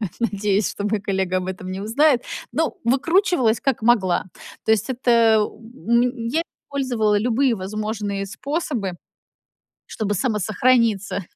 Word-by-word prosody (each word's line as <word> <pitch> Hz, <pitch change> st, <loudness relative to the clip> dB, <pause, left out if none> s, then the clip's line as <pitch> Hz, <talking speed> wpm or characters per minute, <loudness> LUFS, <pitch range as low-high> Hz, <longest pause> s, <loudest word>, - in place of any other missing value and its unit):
на 210 Hz, -, -2 dB
надеюсь, 205 Hz, -3 st, 0 dB
что 205 Hz, -, -6 dB
мой 210 Hz, 0 st, 0 dB
коллега 190 Hz, -2 st, -1 dB
об 185 Hz, -, -5 dB
этом 185 Hz, 0 st, -6 dB
не 190 Hz, +1 st, -4 dB
узнает. 250 Hz, +4 st, +2 dB, 0.3 s
Но 320 Hz, 0 st, -1 dB
выкручивалась 275 Hz, -, +2 dB
как 270 Hz, -5 st, -1 dB
могла. 210 Hz, -7 st, +2 dB, 0.4 s
То -, -, 0 dB
есть 215 Hz, +2 st, +1 dB
это, 250 Hz, -1 st, -1 dB, 0.3 s
м, 235 Hz, +1 st, -1 dB
я 320 Hz, +7 st, 0 dB, 0.2 s
использовала 240 Hz, -7 st, 0 dB
любые 245 Hz, +3 st, +2 dB
возможные 205 Hz, 0 st, -3 dB
способы, 240 Hz, -, -3 dB, 0.9 s
чтобы 205 Hz, -2 st, -3 dB
самосохраниться, 215 Hz, -2 st, +1 dB
220 Hz, 125 wpm, -22 LUFS, 200-255 Hz, 0.9 s, узнает